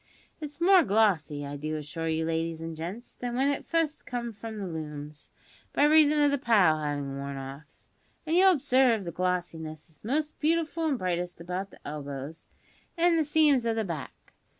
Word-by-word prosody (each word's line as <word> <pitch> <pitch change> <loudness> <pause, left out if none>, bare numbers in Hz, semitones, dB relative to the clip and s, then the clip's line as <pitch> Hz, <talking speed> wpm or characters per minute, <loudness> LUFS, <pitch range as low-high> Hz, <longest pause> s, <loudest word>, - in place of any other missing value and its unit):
It's 300 -1 -7
more 370 +2 +6
glossy, 190 - +1
I 145 0 -5
do 155 +2 -3
assure 155 +2 -5
you, 160 0 0
ladies 165 0 -2
and 165 0 -6
gents, 180 +10 -7
than 245 -1 -5
w'en 270 +3 +2
it 285 - -4
fust 325 -2 -1
comed 235 -2 -4
from 220 +1 -7
the 200 - -4
looms, 150 -3 -7 0.4
by - - +3
reason 300 0 +6
of 290 -1 +4
the 285 - 0
pile 200 - +4
havin' 145 -2 -3
worn 140 0 -5
off; 135 +3 -10 0.4
and 320 +1 0
you'll 380 +1 +7
obsarve 255 -5 +3
that - - -9
the 170 - -4
glossiness 165 -3 -3
is 150 - -21
most 300 +7 -2
beautiful 325 +1 +1
and 285 -4 +1
brightest 180 -3 -2
about 180 +3 -4
the - - -14
elbows 145 +1 -7 0.5
an' 340 0 +4
the 320 - +3
seams 295 -4 +3
o' 230 -1 0
the 225 - 0
back. 160 -7 -7
185 Hz, 190 wpm, -28 LUFS, -, 0.5 s, you'll